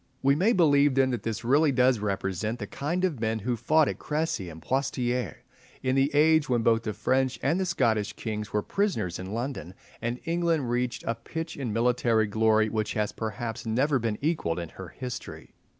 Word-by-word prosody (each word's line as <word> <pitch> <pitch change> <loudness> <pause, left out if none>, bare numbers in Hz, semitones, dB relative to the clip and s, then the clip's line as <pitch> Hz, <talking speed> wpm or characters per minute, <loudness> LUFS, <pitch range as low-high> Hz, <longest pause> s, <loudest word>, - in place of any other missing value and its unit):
We 135 +1 +5
may 190 +9 +3
believe 145 - +4
then 135 -1 +3
that 120 - -2
this 115 0 -4
really 145 +5 +4
does 130 -2 +3
represent 100 +2 -2
the 110 - -5
kind 170 - -2
of 160 -9 -2
men 110 0 0
who 120 +3 -1
fought 155 +6 +3
at - - -3
Crecy 150 - -2
and 80 0 -10
at - - -21
Poictiers, 125 -2 -1 0.5
in 130 0 +1
the 135 +1 +3
age 155 0 +4
when 120 -2 +2
both 115 -1 +3
the 110 -2 -3
French 130 +5 +1
and 170 - +2
the 190 - 0
Scottish 115 -11 +1
kings 105 -2 -5
were 105 -1 0
prisoners 195 - -1
in 95 +1 -6
London, 115 -5 -4 0.3
and 120 +2 -2
England 165 -6 0
reached 125 0 -1
a 115 - 0
pitch 160 +8 -6
of 135 -3 -4
military 115 0 +2
glory 110 +1 +3
which 110 0 -2
has 105 -1 -1
perhaps 115 +1 -4
never 135 +5 +2
been 110 -2 -1
equalled 150 - 0
in 85 -2 -4
her 95 +2 -9
history. 125 +6 -8
120 Hz, 200 wpm, -27 LUFS, 110-145 Hz, 0.5 s, We